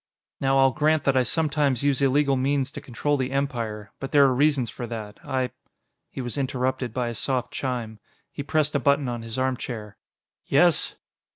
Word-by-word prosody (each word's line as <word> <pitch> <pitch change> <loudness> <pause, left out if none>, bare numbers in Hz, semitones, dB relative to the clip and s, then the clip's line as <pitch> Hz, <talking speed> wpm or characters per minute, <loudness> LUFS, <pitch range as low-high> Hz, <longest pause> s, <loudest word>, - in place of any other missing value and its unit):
"Now, 135 0 +2
I'll 135 0 +5
grant 155 +2 +2
that 135 - +2
I 130 - +5
sometimes 145 0 +1
use 140 -1 +2
illegal 140 +1 +3
means 135 +1 0
to - - -8
control 145 +4 -1
the 130 -1 -2
Empire. 115 -7 -2
But 135 - -5
there 145 -2 +6
are 135 -2 +4
reasons 140 -3 +2
for 120 - -6
that. 110 -3 -7
I 130 -3 -1 0.3
" - - -53
He - - -6
was 125 +3 -4
interrupted 130 -2 -1
by 120 0 -1
a - - -4
soft 125 +2 -2
chime. 120 -5 -3 0.3
He - - -5
pressed 150 +1 +1
a 140 - +2
button 140 +1 +2
on 120 -1 -3
his 115 +1 -6
armchair. 125 -5 -3 0.5
"Yes?" - - +3
130 Hz, 190 wpm, -25 LUFS, 120-140 Hz, 0.5 s, there